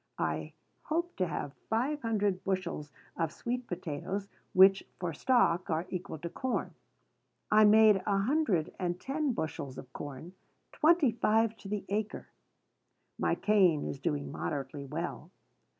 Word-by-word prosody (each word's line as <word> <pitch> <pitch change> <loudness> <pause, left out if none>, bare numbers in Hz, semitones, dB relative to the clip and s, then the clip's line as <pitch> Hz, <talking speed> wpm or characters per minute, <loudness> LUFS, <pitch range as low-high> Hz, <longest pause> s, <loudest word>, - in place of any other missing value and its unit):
I - - -2 0.3
hope 345 +3 -2
to 185 - +1
have 145 -3 -4 0.2
five 265 +7 0
hundred 205 -5 0
bushels 185 -6 -2 0.2
of 165 -2 -1
sweet 240 +7 -4
potatoes, 185 +4 -4 0.2
which, 190 +1 +7 0.2
for 175 -3 -2
stock, 185 - +2
are 160 +2 0
equal 180 -3 -4
to 170 - -5
corn. 260 -1 -2 0.8
I 215 0 +7
made 210 -2 +6
a 200 -1 +3
hundred 210 - +1
and 180 -1 -1
ten 285 +4 -1
bushels 140 - -4
of 130 - -10
corn, 145 +5 -7 0.4
twenty 310 -4 +4
five 225 0 +2
to 200 - -11
the 205 0 -3
acre. 210 +1 -3 0.9
My - - +2
cane 185 -8 +3
is 140 - -4
doing 145 +1 -2
moderately 140 -1 -4
well. 160 +2 -5
195 Hz, 140 wpm, -31 LUFS, 165-225 Hz, 0.9 s, which